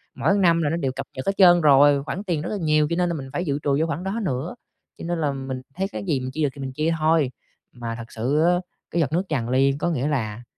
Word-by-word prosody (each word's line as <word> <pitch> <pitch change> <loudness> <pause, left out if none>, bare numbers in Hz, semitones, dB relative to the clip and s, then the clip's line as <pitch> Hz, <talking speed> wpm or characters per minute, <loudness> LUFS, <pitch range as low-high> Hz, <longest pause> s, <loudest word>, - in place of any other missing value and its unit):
mỗi 200 - +2
năm 170 -4 +3
là 150 - +1
nó 165 - -1
đều 135 -6 -1
cập 130 +1 -6
nhật 130 - -5
hết 195 - +2
trơn 175 -3 +7
rồi, 145 -1 +5
khoản 185 +6 -5
tiền 170 -7 -1
rất 160 - -4
là 210 - -2
nhiều, 155 -1 +3
cho 170 - 0
nên 175 0 +1
là 170 - -1
mình 135 -3 -7
phải 175 - -2
dự 140 -2 -1
trù 140 -1 +2
vô 160 - +1
khoản 165 +3 -3
đó 195 +4 -2
nữa, 140 - -3 0.4
cho - - -8
nên 170 -1 -2
là 145 -2 +1
mình 135 -1 -5
thấy 190 +2 -1
cái 200 - -6
gì 160 -8 0
mình 130 0 -5
chia 155 +3 -2
được 145 - +2
thì 140 - -8
mình 135 -1 -4
chia 155 +4 0
thôi. 155 -4 +2 0.4
Mà 115 -1 -6
thật 115 0 -9
sự 130 +7 0
á, 175 +2 +3 0.3
cái 170 - 0
giọt 150 - 0
nước 175 +3 +1
tràn 120 -6 -1
ly 135 +2 +3
có 175 - 0
nghĩa 145 -4 -1
là, 120 -6 -2
150 Hz, 295 wpm, -23 LUFS, 135-170 Hz, 0.4 s, trơn